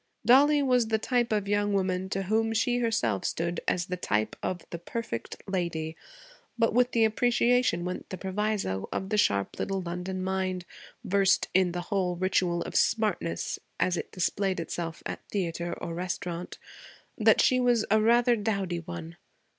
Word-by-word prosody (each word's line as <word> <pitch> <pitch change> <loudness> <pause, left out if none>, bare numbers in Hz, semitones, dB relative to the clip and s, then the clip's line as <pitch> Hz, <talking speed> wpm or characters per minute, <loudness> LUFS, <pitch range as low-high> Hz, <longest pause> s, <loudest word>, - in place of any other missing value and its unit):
Dollie 285 +4 +6
was 250 -4 +3
the 220 0 +2
type 240 +1 0
of 205 -2 0
young 205 0 +1
woman 190 -1 0
to 195 0 -1
whom 225 +3 +1
she 245 +2 +1
herself 125 - 0
stood 170 +1 -1
as 175 -1 +1
the 180 0 -4
type 110 - -1
of 180 -1 -4
the 170 - -5
'perfect 175 - -5
lady'; 170 -4 -2 0.6
but 230 -2 +2
with 245 +1 +3
the 230 -1 +4
appreciation 240 -4 +2
went 180 0 -5
the 185 - -5
proviso 190 - -2
of 190 - -3
the 215 - 0
sharp 100 - +1
little 195 -1 -1
London 180 +1 -4
mind, 185 -1 -2 0.4
versed 195 -2 +2
in 185 -2 +3
the 175 0 -3
whole 185 -3 +1
ritual 180 -1 +1
of - - -8
smartness 210 - 0 0.2
as 180 - +2
it - - -5
displayed 190 +1 0
itself 165 0 -5
at - - -4
theatre 175 -3 -2
or 165 - -5
restaurant, 175 0 -4 0.6
that - - +4
she 255 -2 +4
was 245 -3 +3
a 215 0 +5
rather 240 +2 +4
dowdy 200 -5 -1
one. 85 - -8
190 Hz, 165 wpm, -28 LUFS, 175-220 Hz, 0.6 s, Dollie